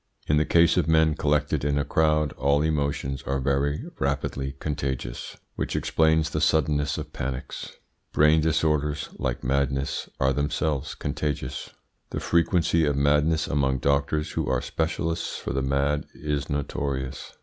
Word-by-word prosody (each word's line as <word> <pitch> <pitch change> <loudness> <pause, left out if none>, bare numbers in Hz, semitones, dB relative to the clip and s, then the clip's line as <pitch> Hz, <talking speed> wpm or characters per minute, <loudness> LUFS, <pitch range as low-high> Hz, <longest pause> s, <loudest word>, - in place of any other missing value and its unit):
In 75 - +3
the 75 - +3
case 85 0 +4
of 85 -4 +2
men 80 -1 +4
collected 75 -2 0
in 70 0 +1
a 70 - 0
crowd 75 -2 +2
all 70 +1 +2
emotions 70 -3 -1
are 70 0 -2
very 70 +2 0 0.2
rapidly 70 0 -1
contagious, 70 -5 -4 0.2
which - - -3
explains 80 -1 +2
the 75 - -1
suddenness 75 -2 +2
of - - -6
panics. 65 +1 -5 0.4
Brain 75 +1 +5
disorders, 75 -2 +1
like 65 -2 -2
madness, 70 +1 0
are 65 +1 +3
themselves 75 0 -1
contagious. 70 -4 -3 0.4
The - - -3
frequency 85 0 +2
of 75 -2 +2
madness 75 +3 +2
among 65 -2 +1
doctors 70 +3 0
who - - -2
are 65 -1 +2
specialists 80 +2 -2
for - - -4
the 70 - 0
mad 70 +2 0
is 75 -1 -3
notorious. 70 -2 -3
75 Hz, 145 wpm, -26 LUFS, 70-75 Hz, 0.4 s, Brain